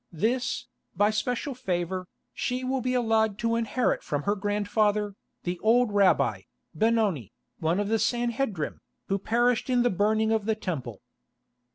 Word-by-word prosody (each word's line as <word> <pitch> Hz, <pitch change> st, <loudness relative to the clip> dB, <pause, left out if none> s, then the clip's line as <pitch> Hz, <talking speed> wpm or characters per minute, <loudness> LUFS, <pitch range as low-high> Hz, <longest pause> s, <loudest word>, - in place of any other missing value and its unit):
This, 230 Hz, +10 st, -1 dB, 0.3 s
by 205 Hz, +1 st, +3 dB
special 245 Hz, +5 st, -1 dB
favour, 185 Hz, -6 st, -2 dB, 0.3 s
she 250 Hz, +1 st, -2 dB
will 260 Hz, 0 st, -1 dB
be 255 Hz, +1 st, 0 dB
allowed 220 Hz, -3 st, +2 dB
to 230 Hz, 0 st, 0 dB
inherit 230 Hz, +2 st, 0 dB
from 145 Hz, -1 st, -3 dB
her 205 Hz, -, +1 dB
grandfather, 205 Hz, 0 st, 0 dB, 0.3 s
the 175 Hz, 0 st, -3 dB
old 235 Hz, +1 st, +3 dB
rabbi, 180 Hz, -, +3 dB, 0.3 s
Benoni, 210 Hz, -, +1 dB, 0.3 s
one 165 Hz, +4 st, +1 dB
of 205 Hz, -, 0 dB
the 225 Hz, +1 st, +1 dB
Sanhedrim, 235 Hz, -, -1 dB, 0.3 s
who 195 Hz, 0 st, +1 dB
perished 240 Hz, +4 st, +1 dB
in 245 Hz, -1 st, +3 dB
the 245 Hz, -, +2 dB
burning 215 Hz, +3 st, +2 dB
of 220 Hz, -2 st, +1 dB
the 220 Hz, 0 st, +1 dB
Temple." 135 Hz, -, -5 dB
215 Hz, 150 wpm, -27 LUFS, 190-235 Hz, 0.3 s, by